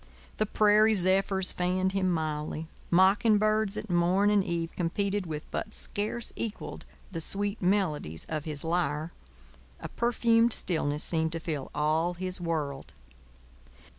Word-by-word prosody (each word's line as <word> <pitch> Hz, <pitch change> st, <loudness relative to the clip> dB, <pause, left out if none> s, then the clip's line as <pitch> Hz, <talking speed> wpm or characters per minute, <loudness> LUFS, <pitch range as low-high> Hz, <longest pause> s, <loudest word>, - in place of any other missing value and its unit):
The 215 Hz, -, 0 dB
prairie 215 Hz, +1 st, +4 dB
zephyrs 190 Hz, 0 st, +2 dB
fanned 185 Hz, +1 st, 0 dB
him 190 Hz, -1 st, 0 dB
mildly; 155 Hz, -1 st, -2 dB, 0.2 s
mocking 195 Hz, +5 st, +4 dB
birds 215 Hz, -1 st, +1 dB
at -, -, -5 dB
morn 180 Hz, +3 st, +2 dB
and 205 Hz, -2 st, +3 dB
eve 170 Hz, -2 st, -3 dB
competed 195 Hz, +2 st, -1 dB
with 155 Hz, -1 st, -4 dB
but 215 Hz, -, -4 dB
scarce 215 Hz, +3 st, -2 dB
equalled 220 Hz, -2 st, -6 dB, 0.2 s
the 165 Hz, -3 st, -4 dB
sweet 200 Hz, +4 st, -1 dB
melodies 175 Hz, -, 0 dB
of 155 Hz, -2 st, -4 dB
his 150 Hz, -3 st, -5 dB
lyre; 165 Hz, -1 st, -1 dB, 0.7 s
a -, -, -7 dB
perfumed 235 Hz, -1 st, +3 dB
stillness 150 Hz, -4 st, 0 dB
seemed 160 Hz, -1 st, 0 dB
to 165 Hz, -, -3 dB
fill 155 Hz, -5 st, -4 dB
all 160 Hz, +4 st, +1 dB
his 185 Hz, 0 st, -4 dB
world. 150 Hz, -5 st, -3 dB
180 Hz, 135 wpm, -28 LUFS, 160-205 Hz, 0.7 s, prairie